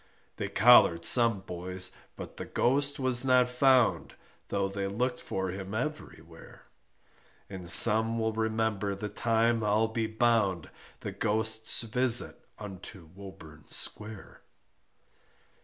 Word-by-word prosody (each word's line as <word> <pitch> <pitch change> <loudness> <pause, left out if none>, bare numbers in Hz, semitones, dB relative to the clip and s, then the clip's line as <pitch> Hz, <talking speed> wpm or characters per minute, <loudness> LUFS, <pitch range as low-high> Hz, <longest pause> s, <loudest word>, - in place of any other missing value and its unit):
They - - -6
collared 100 -7 +3
some 115 -5 +4
boys, 90 0 -3 0.2
but - - -12
the - - -8
Ghost 140 +3 -2
was 130 -2 +1
not 130 -1 +1
found, 125 -1 0 0.3
Though 100 -1 -3
they 100 0 -6
looked 125 +5 -5
for 95 -1 -6
him 95 +2 -9
everywhere, 95 - -10 0.9
And 90 -3 -7
some 115 +2 +8
will 110 -1 -3
remember 110 -2 -4
the 105 +2 -8
time 115 +2 -2
I'll 105 +2 -1
be 110 0 -4
bound 110 -6 -2 0.3
The - - -7
Ghost's 110 +1 -2
visit 120 +1 -1
unto 95 -4 -13
Woburn 95 -6 -15
Square. 105 -1 -6
110 Hz, 120 wpm, -26 LUFS, 95-120 Hz, 0.9 s, some